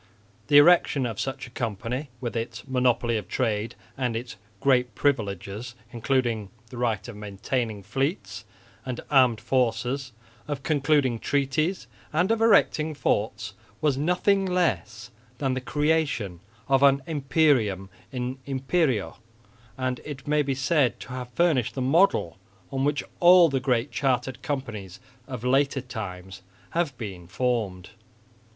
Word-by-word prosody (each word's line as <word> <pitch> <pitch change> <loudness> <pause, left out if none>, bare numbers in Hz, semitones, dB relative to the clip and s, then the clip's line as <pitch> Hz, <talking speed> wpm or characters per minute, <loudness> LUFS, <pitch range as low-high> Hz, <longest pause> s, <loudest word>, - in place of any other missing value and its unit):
The 145 - +6
erection 145 -3 +5
of 115 -4 -4
such 135 - -3
a 120 - -13
company, 120 +4 -3
with 120 -2 -4
its 115 +2 -4
monopoly 125 -3 +1
of 105 -4 -6
trade 110 -2 -1 0.2
and 125 -3 -1
its 115 0 -5 0.2
great 125 -1 +2
privileges 110 -3 -1 0.2
including 120 -4 0 0.2
the 125 - -8
right 115 -4 -1
of 120 - -8
maintaining 105 +1 -3
fleets 135 - -2 0.4
and 125 -1 -4
armed 130 -5 +5
forces, 125 +2 0 0.4
of 145 -2 -4
concluding 140 -5 +2
treaties 145 +4 0 0.3
and 175 +7 +2
of 225 0 +1
erecting 160 -8 +3
forts, 105 -5 -1 0.3
was 150 -3 +2
nothing 180 +7 +2
less 120 - -1 0.3
than 135 -2 0
the 130 - -2
creation 145 - 0 0.3
of 135 -1 +3
an 140 -1 +5
imperium 135 - +1 0.2
in 125 +1 -4
imperio; 135 - 0 0.6
and 130 -1 -2
it 140 -3 -8
may 150 0 +3
be 140 -2 -1
said 135 -1 +1
to - - -9
have 125 -1 -6
furnished 145 -4 +1
the - - -3
model 130 - +2 0.3
on 135 0 -1
which 145 0 +1 0.2
all 175 -1 +7
the 135 -1 0
great 125 0 0
chartered 130 -2 -1
companies 110 -10 -5 0.3
of 125 -4 -6
later 135 +2 +2
times 95 -6 -7 0.3
have 165 -7 -1
been 95 -7 -7
formed. 95 -2 -2
130 Hz, 135 wpm, -26 LUFS, 115-145 Hz, 0.6 s, all